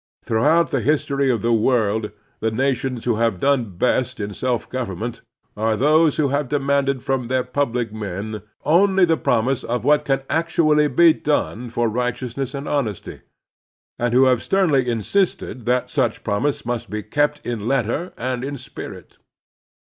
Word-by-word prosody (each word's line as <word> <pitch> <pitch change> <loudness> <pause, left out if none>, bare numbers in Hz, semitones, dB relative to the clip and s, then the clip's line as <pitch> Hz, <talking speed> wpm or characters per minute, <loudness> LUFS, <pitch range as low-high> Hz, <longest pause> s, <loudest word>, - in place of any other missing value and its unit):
Through 110 +2 +1
out 165 +2 +4
the 135 - 0
history 140 +1 +1
of 120 -4 0
the 115 0 +2
world 110 -2 +1 0.3
the 110 - 0
nations 130 0 -1
who 120 -3 +1
have 115 -5 +1
done 120 -9 0
best 125 +3 0
in 100 0 -4
self 125 +2 -2
government 120 -2 -4 0.3
are 110 +1 0
those 155 +3 +3
who 145 -3 +2
have 140 -1 -1
demanded 140 -2 0
from 130 -3 -1
their 130 0 +1
public 125 -3 -2
men 105 0 -5 0.2
only 190 +3 +4
the 165 -1 +2
promise 125 -2 0
of 120 +1 -3
what 150 0 +4
can 135 -1 0
actually 155 -2 +2
be 160 +4 +5
done 125 -6 -2
for 120 +1 0
righteousness 125 +3 -3
and 140 +1 -5
honesty, 115 -10 -3 0.8
and 120 0 0
who 130 +1 +6
have 125 -2 +3
sternly 150 -10 +2
insisted 120 - -1
that 125 0 +1
such 115 - 0
promise 115 +8 -1
must 120 -1 -3
be 105 0 -4
kept 145 +6 0
in 115 -3 -3
letter 135 - -1
and 125 0 -3
in 140 +1 -4
spirit. 130 - -10
125 Hz, 160 wpm, -21 LUFS, 115-140 Hz, 0.8 s, who